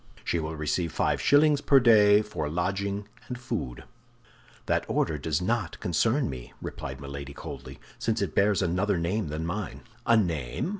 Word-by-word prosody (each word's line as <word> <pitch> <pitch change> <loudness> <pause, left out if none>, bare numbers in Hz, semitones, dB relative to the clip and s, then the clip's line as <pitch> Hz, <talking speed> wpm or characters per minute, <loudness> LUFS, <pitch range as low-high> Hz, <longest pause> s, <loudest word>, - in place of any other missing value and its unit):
She 85 - 0
will 80 0 -4
receive 80 +2 -1
five - - 0
shillings 145 0 +5
per 140 -1 +6
day 105 -4 +6
for 75 -8 -4
lodging 100 +4 -2 0.2
and 125 -1 -5
food'". 65 - -4 0.8
"That - - +1
order 75 -2 0
does 80 +4 -1
not 115 +5 -1
concern 110 - +1
me," 65 -3 -7
replied 65 0 -6
Milady, 70 0 -7
coldly, - - -8 0.2
"since - - 0
it - - -2
bears 100 -1 +3
another 90 +3 +1
name 90 +4 -1
than 75 +2 -3
mine." 90 0 -4 0.3
"A 115 - +6
name? 80 - -1
90 Hz, 160 wpm, -27 LUFS, 75-105 Hz, 0.8 s, per